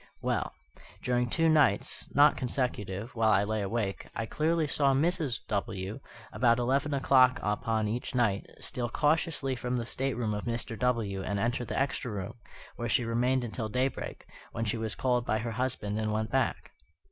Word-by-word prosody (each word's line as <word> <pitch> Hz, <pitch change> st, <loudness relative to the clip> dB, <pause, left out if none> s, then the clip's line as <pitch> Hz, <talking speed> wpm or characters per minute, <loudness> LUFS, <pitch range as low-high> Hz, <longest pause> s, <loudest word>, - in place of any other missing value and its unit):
Well, -, -, -1 dB, 0.5 s
during 125 Hz, -1 st, +1 dB
two 165 Hz, +7 st, +2 dB
nights 150 Hz, -11 st, +2 dB
(not 145 Hz, +2 st, +7 dB
consecutive), 120 Hz, -4 st, -2 dB
while 110 Hz, -1 st, +2 dB
I 100 Hz, -1 st, +4 dB
lay 110 Hz, +1 st, -1 dB
awake, 100 Hz, -1 st, -2 dB
I 115 Hz, -, -2 dB
clearly 160 Hz, +6 st, +1 dB
saw 140 Hz, -1 st, +2 dB
Mrs. 155 Hz, -3 st, +1 dB
W., 100 Hz, +1 st, -3 dB, 0.3 s
about 115 Hz, +1 st, +4 dB
eleven 135 Hz, +5 st, +1 dB
o'clock 130 Hz, -2 st, +5 dB
upon 110 Hz, +1 st, 0 dB
each 120 Hz, +4 st, -3 dB
night, 110 Hz, -6 st, +1 dB
steal 120 Hz, -1 st, -3 dB
cautiously 150 Hz, -1 st, +1 dB
from 125 Hz, +1 st, -2 dB
the 120 Hz, -, -2 dB
stateroom 120 Hz, -3 st, -1 dB
of 105 Hz, -, -4 dB
Mr. 115 Hz, 0 st, -3 dB
W. 115 Hz, -6 st, 0 dB
and 100 Hz, +1 st, -2 dB
enter 120 Hz, +3 st, 0 dB
the -, -, -2 dB
extra 135 Hz, -2 st, -1 dB
room, 100 Hz, -2 st, -4 dB, 0.4 s
where 120 Hz, 0 st, -3 dB
she 120 Hz, -, +2 dB
remained 125 Hz, +3 st, +1 dB
until 110 Hz, -1 st, -3 dB
daybreak, 130 Hz, +4 st, -2 dB, 0.3 s
when 115 Hz, 0 st, -2 dB
she 105 Hz, -, 0 dB
was 110 Hz, -1 st, -3 dB
called 125 Hz, -2 st, +1 dB
by 110 Hz, -, 0 dB
her 115 Hz, +1 st, -3 dB
husband 110 Hz, -3 st, -2 dB
and 110 Hz, -1 st, -1 dB
went 110 Hz, +1 st, -1 dB
back. 135 Hz, 0 st, 0 dB
120 Hz, 170 wpm, -30 LUFS, 110-130 Hz, 0.5 s, not